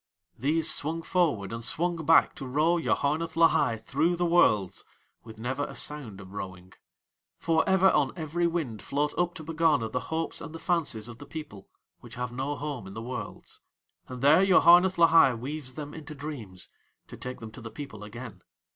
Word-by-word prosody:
These 155 +6 +1
swung 165 +3 -3
forward 145 - 0
and 115 0 -5
swung 175 +7 +1
back 165 - +5
to 135 - -6
row 155 +6 +2
Yoharneth 160 0 0
Lahai 165 -8 +4
through 165 +10 0
the 175 +1 0
Worlds 105 - +3 0.4
with 110 -1 -12
never 130 +5 -3
a - - -9
sound 130 -10 -5
of 95 -1 -12
rowing. 95 -2 -8 0.6
For 160 -1 +2
ever 190 0 +5
on 140 -3 +2
every 170 +1 -1
wind 155 -11 -3
float 145 +1 -1
up 175 +1 0
to 160 - -8
Pegana 155 -7 +1
the - - -2
hopes 165 +1 -3
and 165 -1 -8
the - - -7
fancies 160 -10 -1
of 120 -1 -10
the - - -11
people 150 -12 -9 0.3
which - - -12
have 125 -1 -4
no 135 +4 -3
home 145 -8 -5
in 95 - -10
the 110 - -6
Worlds, 125 +1 -7 0.5
and 130 0 -8
there 155 +6 +6
Yoharneth 185 0 +6
Lahai 165 -6 +6
weaves 135 0 -6
them 145 -1 -7
into 155 -1 -9
dreams, 130 -11 -8 0.4
to - - -11
take 125 0 -7
them 115 -1 -9
to 105 - -11
the 115 - -7
people 110 -3 -9
again. 110 -2 -9
145 Hz, 185 wpm, -28 LUFS, 115-165 Hz, 0.6 s, there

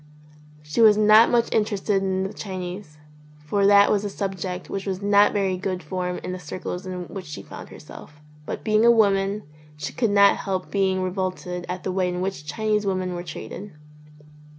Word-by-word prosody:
She 150 +9 -1
was 215 -2 +7
not 215 +2 +6
much 235 -1 +1
interested 205 -2 +1
in 190 -1 -1
the 195 - -4
Chinese, 185 -4 -7 0.5
for 200 +6 +2
that 200 0 +6
was 205 -1 +1
a 205 - -2
subject 190 -2 -4
which 195 0 -5
was 190 -1 -2
not 205 0 +4
very 195 -2 0
good 185 0 -3
form 180 -1 -3
in - - -4
the 185 - -5
circles 180 +2 -6
in 180 -1 -5
which 190 -5 -8
she 150 - -7
found - - -10
herself, 150 0 -13 0.3
but - - -5
being 215 0 +3
a 235 - +7
woman 200 -2 +3 0.3
she - - -5
could 230 -3 +1
not 200 0 +5
help 190 -2 -4
being 190 -2 +1
revolted 185 -1 -3
at 180 0 -4
the 185 - -2
way 185 -1 0
in 180 0 -3
which 185 -5 -4
Chinese 215 +5 0
women 185 -2 -1
were 175 - -4
treated. 180 +3 -8
190 Hz, 190 wpm, -24 LUFS, 180-205 Hz, 0.5 s, was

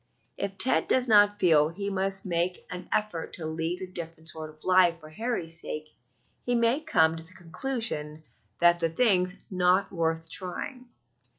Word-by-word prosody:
If 195 -1 -4
Ted 260 - +2
does 255 -1 +3
not 205 -2 +5
feel 155 -5 +4
he 200 +4 -4
must 195 0 +1
make 175 0 -1
an 180 0 -7
effort 210 -6 -2
to 165 - -2
lead 165 +3 -3
a - - -3
different 165 -2 -7
sort 155 -1 -7
of 155 0 -18
life 180 -2 +4
for 155 -1 -13
Harold's 170 -5 -3
sake, 155 0 -7 0.5
he 245 - 0
may 235 +3 +2
come 160 - +3
to 165 - -7
the 175 +3 -11
conclusion 175 - -3 0.4
that 175 0 +5
the 165 -1 +1
thing's 185 -2 +3 0.2
not 185 +1 +2
worth 165 -1 -1
trying. 240 - -5
180 Hz, 170 wpm, -27 LUFS, 165-200 Hz, 0.5 s, not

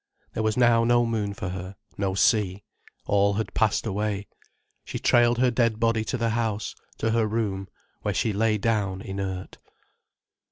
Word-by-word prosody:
There - - -2
was 110 +1 0
now 120 -2 +5
no 120 0 +4
moon 105 -3 -2
for 90 - -4
her, 95 +1 -6 0.2
no 95 -1 -1
sea. 100 -2 +2 0.4
All 100 0 +3
had 110 +1 -3
passed 110 0 +1
away. 105 -1 -2 0.6
She - - -5
trailed 120 0 +4
her 125 0 +3
dead 115 -2 +1
body 115 -1 +2
to 125 - -2
the 115 -1 0
house, 110 -2 -1 0.2
to 110 - 0
her 115 -1 +2
room, 105 -3 -2 0.3
where - - -2
she 110 - +1
lay 110 +1 +2
down 100 -3 0
inert. 95 -2 -5
110 Hz, 165 wpm, -26 LUFS, 100-115 Hz, 0.6 s, now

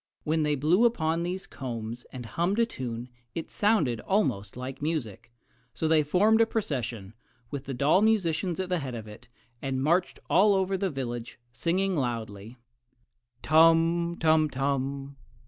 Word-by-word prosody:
When 160 +1 +1
they 150 -1 +1
blew 165 - +3
upon 165 -8 +1
these 185 +2 -3
combs 120 -2 -6
and 125 -2 -7
hummed 175 - -1
a 230 - +4
tune 120 - -6 0.3
it 165 - -5
sounded 195 - +2
almost 125 - -1
like 130 +2 -6
music; 120 - -3 0.4
so 160 +7 -1
they 160 -1 +4
formed 205 +9 +3
a 225 - +4
procession, 120 - -3 0.4
with 140 -1 -5
the 135 - -4
doll 145 +9 +3
musicians 190 -5 +1
at 185 -1 -2
the 180 -1 +1
head 130 -4 -5
of 110 -2 -7
it, 110 +3 -12 0.3
and 135 -1 -2
marched 170 +5 +1
all 200 +3 +5
over 190 0 +1
the 190 0 -1
village, 120 -5 -5 0.2
singing 185 +8 0
loudly: 115 -4 -4 0.9
Tum, 165 +2 +4
tum 155 -1 +3
tum! 135 0 -2
150 Hz, 155 wpm, -28 LUFS, 125-180 Hz, 0.9 s, all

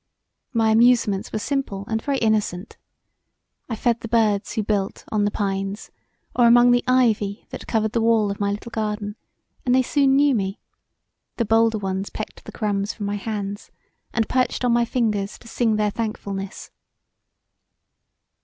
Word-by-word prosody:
My 225 -3 +2
amusements 225 -3 +3
were - - -2
simple 215 -4 -2
and 220 0 -1
very 280 +1 -1
innocent; 215 -4 0 0.9
I 230 - -2
fed 235 +1 +1
the 225 - -6
birds 215 -3 +1
who 220 - -1
built 200 -2 -2
on 210 -1 +2
the - - +2
pines 195 0 -3 0.4
or 240 -1 +5
among 240 +1 +7
the 245 0 +3
ivy 225 -5 +2
that - - -8
covered 220 -1 0
the 230 - 0
wall 225 -2 +3
of 200 - -6
my 200 -1 +1
little 210 +4 -5
garden, 210 -2 -3 0.5
and 250 0 +3
they 260 - +4
soon 275 +1 +3
knew 285 0 +4
me: 195 -2 -2 0.8
the 235 - +1
bolder 225 +1 +3
ones 195 -1 -3
pecked - - -7
the - - -8
crumbs 205 -2 -1
from 205 - -5
my 205 0 -1
hands 205 -1 -5 0.4
and 225 -1 0
perched 255 0 0
on 240 - +3
my 235 0 +3
fingers 215 -5 -1
to - - -16
sing 230 -1 +1
their 210 -1 +1
thankfulness. 200 -3 -5
220 Hz, 165 wpm, -23 LUFS, 205-235 Hz, 0.9 s, among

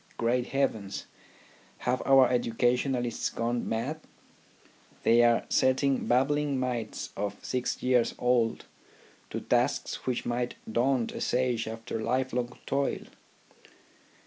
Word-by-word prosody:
Great 120 +1 +1
heavens! 110 -8 -1 0.7
Have 125 +1 -1
our 135 -2 +7
educa 120 0 +2
tionists 125 -2 -1
gone 120 +1 -1
mad? 125 +8 -2 1.0
They 120 +1 +5
are 120 -1 +3
setting 130 +1 +2
babbling 140 +2 +2
mites 120 -4 -3
of 100 0 -3
six 125 -1 -2
years 125 -2 +2
old 125 -2 +1 0.6
to - - -4
tasks - - 0
which 125 -2 -1
might 120 +1 -2
daunt 120 +1 +1
a - - -6
sage 125 -2 0
after 115 0 -5
lifelong 125 0 -1
toil. 140 +1 -1
125 Hz, 115 wpm, -29 LUFS, 115-130 Hz, 1.0 s, our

